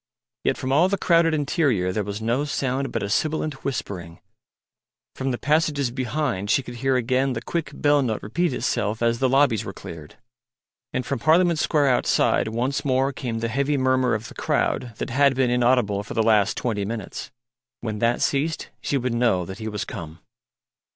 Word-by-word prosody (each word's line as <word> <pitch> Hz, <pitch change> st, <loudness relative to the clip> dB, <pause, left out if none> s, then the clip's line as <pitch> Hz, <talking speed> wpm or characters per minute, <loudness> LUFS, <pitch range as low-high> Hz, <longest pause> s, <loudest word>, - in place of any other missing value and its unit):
Yet -, -, +1 dB
from 130 Hz, -, -3 dB
all 160 Hz, +7 st, +4 dB
the 200 Hz, -, 0 dB
crowded 165 Hz, -3 st, +3 dB
interior 140 Hz, -, +1 dB
there 105 Hz, +3 st, -1 dB
was 100 Hz, +2 st, -5 dB
no 120 Hz, +5 st, +1 dB
sound 135 Hz, -2 st, -2 dB
but -, -, -2 dB
a -, -, -2 dB
sibilant 155 Hz, +5 st, -1 dB
whispering; 90 Hz, -10 st, -4 dB, 1.0 s
from 135 Hz, 0 st, -2 dB
the 125 Hz, -, -1 dB
passages 145 Hz, -3 st, +1 dB
behind 125 Hz, -5 st, -2 dB
she 135 Hz, -, +3 dB
could 120 Hz, -1 st, -8 dB
hear 135 Hz, +2 st, +1 dB
again 130 Hz, +2 st, +1 dB
the 115 Hz, -, -3 dB
quick 165 Hz, +1 st, -2 dB
bell 145 Hz, -1 st, +3 dB
note 115 Hz, -5 st, -2 dB
repeat 170 Hz, +10 st, 0 dB
itself 110 Hz, -2 st, -1 dB
as 115 Hz, 0 st, +2 dB
the 130 Hz, -, +2 dB
lobbies 130 Hz, -5 st, +3 dB
were 95 Hz, -, -6 dB
cleared; 80 Hz, -3 st, -10 dB, 0.8 s
and 130 Hz, -, -2 dB
from -, -, -2 dB
Parliament 165 Hz, +5 st, +3 dB
Square 145 Hz, -4 st, +2 dB
outside 125 Hz, -, +2 dB
once 120 Hz, +5 st, -1 dB
more 135 Hz, 0 st, +1 dB
came 115 Hz, -3 st, -4 dB
the 115 Hz, -, 0 dB
heavy 140 Hz, +4 st, 0 dB
murmur 130 Hz, -2 st, +2 dB
of 110 Hz, +2 st, -5 dB
the -, -, -11 dB
crowd 120 Hz, -3 st, -1 dB
that -, -, -4 dB
had 140 Hz, +1 st, +4 dB
been 130 Hz, -2 st, +2 dB
inaudible 120 Hz, -5 st, +2 dB
for 105 Hz, -, -8 dB
the 110 Hz, -, +2 dB
last 105 Hz, -3 st, +3 dB
twenty 110 Hz, -5 st, -1 dB
minutes. 110 Hz, 0 st, -5 dB, 0.5 s
When 110 Hz, -2 st, -4 dB
that 115 Hz, +2 st, +1 dB
ceased 155 Hz, +3 st, -1 dB
she 140 Hz, -, 0 dB
would 125 Hz, -2 st, -1 dB
know 115 Hz, -7 st, +2 dB
that 95 Hz, +4 st, -8 dB
he 110 Hz, -, -5 dB
was 105 Hz, -2 st, -3 dB
come. 80 Hz, -1 st, -7 dB
125 Hz, 190 wpm, -24 LUFS, 110-140 Hz, 1.0 s, all